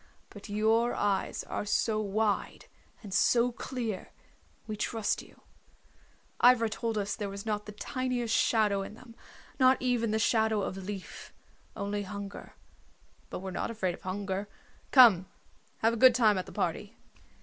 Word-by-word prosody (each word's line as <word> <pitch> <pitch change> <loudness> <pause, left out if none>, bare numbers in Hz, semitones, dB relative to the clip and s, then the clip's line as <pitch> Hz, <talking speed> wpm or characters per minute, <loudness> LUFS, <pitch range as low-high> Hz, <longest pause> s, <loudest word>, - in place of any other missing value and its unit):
But 205 0 -11
your 220 +3 +2
eyes 200 -2 -1
are - - -4
so 215 +1 0
wide 210 0 -1 0.4
and 200 -3 -8
so 240 +5 +3
clear, 235 -5 -5 0.6
we 215 - -4
trust 215 +1 -1
you. - - -18 1.0
Ivra 240 -2 +6
told 225 0 -3
us 200 0 -1
there 205 -2 -4
was 200 +2 -7
not 210 -1 -2
the - - -6
tiniest 245 +1 -2
shadow 210 -3 +2
in 195 - -7
them, 235 0 -14 0.5
not 260 0 +5
even 245 -3 0
the 215 - +1
shadow 220 -2 +2
of 190 - -3
leaf. 195 -1 -8 0.4
Only 205 +1 -3
hunger. 200 0 -8 0.7
But - - -6
we're 190 0 -5
not - - -3
afraid 190 -6 -2
of - - -12
hunger. 195 +1 -4 0.4
Come, 220 -9 +7 0.6
have 225 +1 +4
a - - -2
good 255 -2 +8
time 215 -5 +4
at 185 - -6
the - - -9
party." - - -3
215 Hz, 155 wpm, -30 LUFS, 200-230 Hz, 1.0 s, good